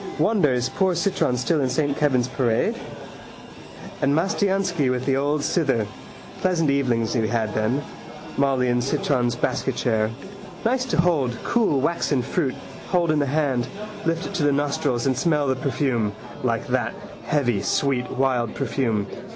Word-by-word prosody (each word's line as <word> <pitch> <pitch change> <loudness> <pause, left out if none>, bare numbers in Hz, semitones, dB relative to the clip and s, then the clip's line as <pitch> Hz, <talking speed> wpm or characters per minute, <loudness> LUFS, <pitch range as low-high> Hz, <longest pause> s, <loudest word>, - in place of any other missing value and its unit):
Wonder 200 -10 +3
is 125 0 +1
poor 190 -2 +1
Citron 170 -8 +1
still 150 +5 +1
in 130 - +1
Saint 140 +2 0
Kevin's 130 -5 +2
parade. 120 -3 +1 1.3
And 140 +1 +3
Mastiansky 190 -4 +1
with 125 0 -1
the 135 - +2
old 145 +2 0
cither. 135 - +1 0.5
Pleasant 165 -5 +2
evenings 120 -5 +1
we 110 -2 +1
had 110 -2 -1
then. 115 +7 0 0.5
Molly 135 -2 +2
in 120 0 +2
Citron's 125 -2 0
basketchair. 110 -2 0 0.6
Nice 255 +2 +2
to 245 - -1
hold, 150 -9 +2
cool 215 - +2
waxen 145 -4 +1
fruit, 140 -4 -1 0.3
hold 175 -3 +2
in 155 - +2
the 145 - +1
hand, 135 -4 0 0.4
lift 165 +1 -1
it - - -6
to 180 - 0
the 145 - +4
nostrils 140 -3 0
and 135 -1 +2
smell 150 +2 +1
the 130 -1 +1
perfume. 130 -5 0 0.3
Like - - 0
that, - - 0 0.3
heavy, 120 -9 +1
sweet, 125 +4 0
wild 125 -4 0
perfume. 115 -5 0
135 Hz, 150 wpm, -23 LUFS, 125-155 Hz, 1.3 s, the